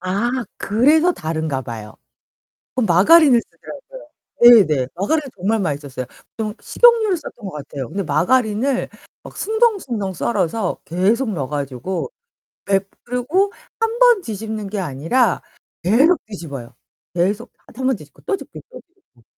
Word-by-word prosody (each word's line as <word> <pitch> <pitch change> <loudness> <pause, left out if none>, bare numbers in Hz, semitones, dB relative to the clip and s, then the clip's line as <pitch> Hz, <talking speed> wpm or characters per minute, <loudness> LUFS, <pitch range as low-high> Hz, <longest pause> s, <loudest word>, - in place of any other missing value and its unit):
아 200 +6 -1 0.3
그래서 305 - +3
다른가 160 - -3
봐요. 110 -2 -8 0.8
그 255 - +1
마가린을 240 - +6
쓰더라고요. - - -12 0.3
네 240 -4 +9
네. 135 -5 0
마가린이 280 - -1
정말 205 +4 0
맛있었어요. 145 -7 -3 0.3
좀 215 -1 -3
식용유를 455 -6 +4
썼던 245 -7 -10
것 190 - -5
같아요. 140 -3 -7
근데 195 0 -3
마가린을 220 - +1 0.3
막 - - -12
숭덩숭덩 395 - 0
썰어서 190 +1 -1
계속 210 +8 +1
넣어 140 -7 -3
가지고 145 - -4 0.5
백 195 0 +1
그러고 295 +12 0 0.3
1 455 +1 0
번 485 -4 +6
뒤집는 220 - -5
게 205 0 -3
아니라 175 - +1 0.4
계속 270 - +4
뒤집어요, 140 - -8 0.4
계속. 180 +4 -1 0.2
1 260 +2 -4
번 265 - +2
뒤집고 150 -5 -15
또 400 - 0
뒤집고 - - -11
또 - - -10
뒤집고. 330 - -31
210 Hz, 295 characters per minute, -20 LUFS, 165-275 Hz, 0.8 s, 네